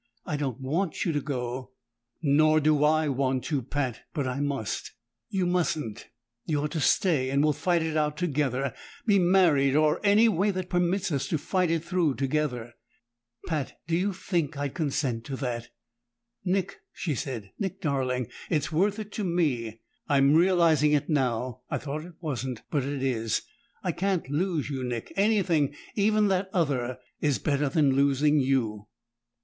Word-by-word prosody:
I 150 - -2
don't 140 -4 -2
want 160 +7 -1
you 170 - +1
to 145 -2 -1
go!" 130 -2 -4 0.5
"Nor 155 +2 +4
do 150 -1 +3
I 155 +1 +3
want 130 -2 0
to, 145 -4 -1
Pat! 130 -3 -3
But 145 -4 0
I 130 +1 -2
must." 140 -6 -3 0.4
"You 190 -3 0
mustn't! 160 -10 -1 0.4
You're 150 -2 -1
to 160 - -3
stay, 145 -3 +2
and 140 +2 +2
we'll 150 0 +3
fight 170 +3 +1
it 160 -1 -2
out 150 -1 +1
together 140 -6 0 0.3
be 205 -4 +4
married, 170 -7 +4
or 155 0 +3
any 210 +3 +5
way 205 -1 +2
that 185 -2 -3
permits 180 +1 +1
us 140 -3 -1
to 160 - 0
fight 180 +4 0
it 165 -1 0
through 170 -5 +1
together." 130 -4 -1 0.7
"Pat! 155 -5 -3
Do 165 +1 0
you 190 +4 +1
think 175 -6 -2
I'd 145 -1 -2
consent 140 -7 -1
to 135 - -4
that?" 120 -3 -4 0.7
"Nick," 190 +1 -1
she 160 - -3
said. 120 -8 -5
"Nick 190 -1 -3
darling 130 -6 0 0.2
It's 155 -1 0
worth 195 +6 +2
it 215 -1 -6
to 210 - -3
me! 130 - -1 0.3
I'm 140 0 +5
realizing 165 -3 +4
it 145 +2 +1
now; 125 -3 0
I - - -1
thought 150 +2 -5
it 175 -1 -12
wasn't 130 -7 -4
but 145 -4 +1
it 140 0 -3
is! 115 -4 0 0.4
I 180 - +1
can't 190 -1 -1
lose 165 -1 0
you, 135 -3 -3
Nick 120 -2 -4
anything, 190 -9 +2 0.2
even 215 0 +3
that 190 0 0
other, 130 -8 0 0.2
is 145 -3 +1
better 145 -1 0
than 145 -3 +3
losing 140 +2 +3
you." 115 -6 0
150 Hz, 165 wpm, -27 LUFS, 135-175 Hz, 0.7 s, any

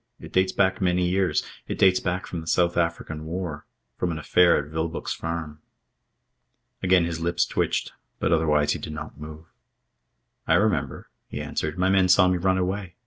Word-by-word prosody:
It - - -12
dates 95 0 +3
back 95 0 +1
many 90 -1 +2
years. 95 0 +1 0.2
It - - -4
dates 95 -1 +5
back 90 +1 -2
from 85 - -5
the 80 - -11
South 85 0 +2
African 85 -2 -2
War. 80 -2 -5 0.3
From 90 - 0
an 80 - -4
affair 85 +3 +4
at 70 - -4
Vilboek's 80 +1 -3
Farm." 80 -2 -5 1.2
Again 90 -2 +4
his 85 -1 -3
lips 85 +1 +1
twitched; - - -1 0.3
but 80 - 0
otherwise 75 -2 +2
he - - -2
did 75 - -7
not 75 - -8
move. 80 +1 -9 1.0
"I - - +4
remember," - - 0 0.2
he - - -6
answered. 80 +2 -3
"My 95 +1 +2
men 95 -1 +4
saw 90 0 +6
me 90 0 +2
run 95 +1 +1
away. 95 0 -3
85 Hz, 180 wpm, -25 LUFS, 80-95 Hz, 1.2 s, saw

